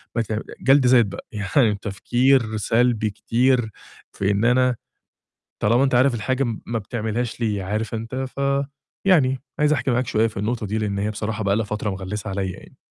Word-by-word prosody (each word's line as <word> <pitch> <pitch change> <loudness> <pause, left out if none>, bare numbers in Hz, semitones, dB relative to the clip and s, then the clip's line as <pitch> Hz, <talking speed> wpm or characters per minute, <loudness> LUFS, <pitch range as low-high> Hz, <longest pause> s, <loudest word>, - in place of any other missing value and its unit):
ما 115 - +2
ت 110 - -5 0.3
جلد 135 0 +5
ذات 120 -2 +6
بقى، 100 - -8
يعني 105 +2 +1
تفكير 120 +2 +1
سلبي 115 0 +1
كتير، 120 +3 +1 0.4
في 100 +1 0
إن 100 +3 +1
أنا 125 0 +3 0.9
طالما 120 +5 +4
أنت 130 -2 +2
عارف 130 +1 +4
الحاجة 130 +5 0
م 115 -3 -3
ما 115 -1 -2
بتعملهاش 110 +2 -3
ليه، 105 -4 -1
عارف 110 +4 -3
أنت، 115 +3 -5 0.2
ف - - -4 0.7
يعني 135 -8 +4 0.2
عايز 150 0 +4
أحكي 130 -2 0
معاك 125 0 0
شوية 110 +1 +2
في 110 - -9
النقطة 110 +2 -2
دي، 110 - -2
لإن 105 -2 -2
هي 105 +2 -1
بصراحة 110 +1 -3
بقى 100 0 +2
لها 115 0 0
فترة 105 0 -3
مغلسة 95 +2 -5
عليَّ 95 -1 -2
يعني. - - -14
115 Hz, 185 wpm, -22 LUFS, 105-125 Hz, 0.9 s, ذات